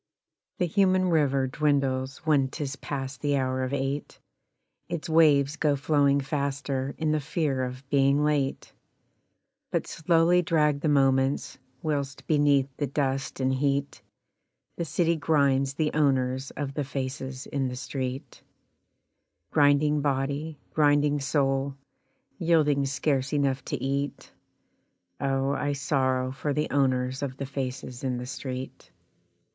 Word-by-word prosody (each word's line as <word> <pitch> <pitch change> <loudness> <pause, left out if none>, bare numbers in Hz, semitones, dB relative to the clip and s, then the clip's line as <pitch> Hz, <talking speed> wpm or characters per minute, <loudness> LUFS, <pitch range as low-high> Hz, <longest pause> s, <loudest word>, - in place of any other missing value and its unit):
The 180 - +1
human 185 +1 +2
river 140 -4 +2
dwindles 135 0 0
when 145 -4 +3
'tis 135 0 -5
past 135 -1 -5
the 145 -1 +1
hour 130 0 0
of 130 - -3
eight, 140 +1 -3 0.7
Its 170 -2 -4
waves 155 -2 +4
go 150 -3 +2
flowing 140 0 +2
faster 140 -1 -2
in 155 -1 0
the 155 - +2
fear 150 -3 -1
of 130 +1 -6
being 140 +1 +3
late; 145 -3 -1 1.0
But - - -1
slowly 165 +2 +3
drag 150 -4 +2
the 155 - 0
moments, 135 -1 +2 0.2
whilst 140 -3 -2
beneath 145 -3 +3
the 145 - -1
dust 135 0 -2
and 130 0 +1
heat 140 +1 -1 0.7
The 170 - -3
city 170 +3 +1
grinds 140 -3 +2
the 155 0 0
owners 130 -3 +1
of 140 -2 -3
the 145 - -2
faces 130 -1 -5
in 135 -2 -2
the 125 - -4
street 130 0 -5 1.1
Grinding 145 0 +3
body, 140 +2 -1 0.2
grinding 145 -1 +3
soul, 135 -1 0 0.6
Yielding 150 -5 +3
scarce 135 0 0
enough 140 -2 +1
to 145 - -2
eat 140 +2 -3 0.9
Oh! 135 0 0
I 145 0 -1
sorrow 130 -2 0
for 140 +2 -2
the 150 +2 -1
owners 130 -2 +1
of 135 -2 -4
the 140 - -4
faces 130 -2 -5
in 130 -2 -1
the 125 - -5
street. 130 0 -6
140 Hz, 130 wpm, -27 LUFS, 135-150 Hz, 1.1 s, waves